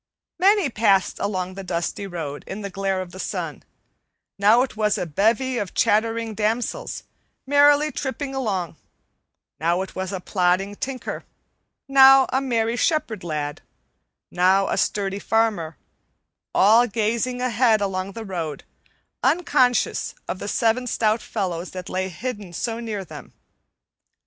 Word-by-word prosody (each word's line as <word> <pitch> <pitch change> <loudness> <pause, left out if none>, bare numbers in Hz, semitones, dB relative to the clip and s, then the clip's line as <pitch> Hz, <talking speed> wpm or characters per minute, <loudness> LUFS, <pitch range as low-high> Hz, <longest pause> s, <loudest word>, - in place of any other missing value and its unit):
Many 390 - +4
passed 200 -4 +2
along 185 -2 -2
the 195 +1 -7
dusty 180 +2 -3
road 160 -6 -6
in 200 +3 -6
the 200 -1 -6
glare 195 0 -1
of 175 - -13
the 185 - -10
sun: - - -4 0.8
now 215 +5 +5
it 265 - -6
was 210 -1 +1
a - - -2
bevy 225 - +1
of 200 - -5
chattering 225 +1 +1
damsels 225 - -2 0.4
merrily 290 +2 +4
tripping 270 0 -4
along; 195 -11 -2 0.8
now 170 +4 +1
it 190 - -10
was 190 0 -4
a 190 - -3
plodding 185 +2 0
tinker; 260 +3 -5 0.6
now 270 -1 +8
a 265 - +2
merry 230 -3 0
shepherd 235 - 0
lad; 150 -3 -4 0.7
now 190 +2 +3
a - - 0
sturdy 200 -1 -1
farmer; 210 -8 0 0.8
all 225 +5 +6
gazing 230 +3 -1
ahead 240 -2 +3
along 195 -1 -2
the 225 +1 -7
road, 165 -7 -4 0.6
unconscious 255 -8 +2
of 185 - -4
the - - -5
seven 230 +4 +1
stout 220 -1 +1
fellows 180 -5 -3
that 185 -1 -8
lay 190 +1 -2
hidden 205 0 -6
so 230 +6 -3
near 215 -4 -4
them. - - -11
210 Hz, 140 wpm, -23 LUFS, 185-245 Hz, 0.8 s, now